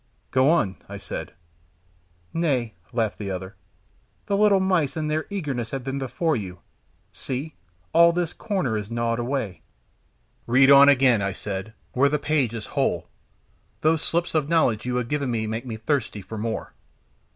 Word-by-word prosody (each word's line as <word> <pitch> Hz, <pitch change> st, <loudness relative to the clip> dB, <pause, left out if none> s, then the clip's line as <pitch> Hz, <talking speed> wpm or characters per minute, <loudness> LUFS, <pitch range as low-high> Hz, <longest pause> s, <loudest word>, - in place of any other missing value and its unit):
"Go 130 Hz, +2 st, +4 dB
on," 105 Hz, -, +2 dB
I -, -, -6 dB
said. -, -, -6 dB, 1.0 s
"Nay," 135 Hz, -9 st, 0 dB, 0.2 s
laughed 115 Hz, -4 st, -1 dB
the 100 Hz, -2 st, -4 dB
other, 95 Hz, +1 st, -5 dB, 0.7 s
"the 200 Hz, -, 0 dB
little 200 Hz, -1 st, +5 dB
mice 180 Hz, -6 st, +1 dB
in 155 Hz, -1 st, -1 dB
their 155 Hz, +1 st, -1 dB
eagerness 140 Hz, -, -3 dB
have 135 Hz, -2 st, -4 dB
been 135 Hz, +1 st, -3 dB
before 155 Hz, +4 st, 0 dB
you 95 Hz, -6 st, -5 dB, 0.6 s
see, 140 Hz, +4 st, -5 dB, 0.4 s
all 170 Hz, +1 st, +7 dB
this 170 Hz, -1 st, -1 dB
corner 185 Hz, -, -1 dB
is 105 Hz, -1 st, -4 dB
gnawed 115 Hz, 0 st, -1 dB
away." 120 Hz, -5 st, -2 dB, 0.9 s
"Read 130 Hz, +3 st, +6 dB
on 140 Hz, 0 st, +9 dB
again," 130 Hz, -5 st, +4 dB
I 100 Hz, 0 st, -1 dB
said, 100 Hz, +1 st, -5 dB, 0.2 s
"where 140 Hz, +3 st, +4 dB
the 150 Hz, -, +1 dB
page 140 Hz, -6 st, 0 dB
is 110 Hz, -, -5 dB
whole; -, -, 0 dB, 0.7 s
those 160 Hz, 0 st, +3 dB
sips 170 Hz, +2 st, -1 dB
of 155 Hz, -2 st, +1 dB
knowledge 125 Hz, -9 st, +2 dB
you 125 Hz, -, -1 dB
have 125 Hz, -1 st, -1 dB
given 140 Hz, -1 st, -1 dB
make 115 Hz, +1 st, -2 dB
me 110 Hz, -2 st, -4 dB
thirsty 110 Hz, -4 st, -2 dB
for 110 Hz, +3 st, -7 dB
more. 110 Hz, +1 st, -3 dB
130 Hz, 160 wpm, -24 LUFS, 110-155 Hz, 1.0 s, on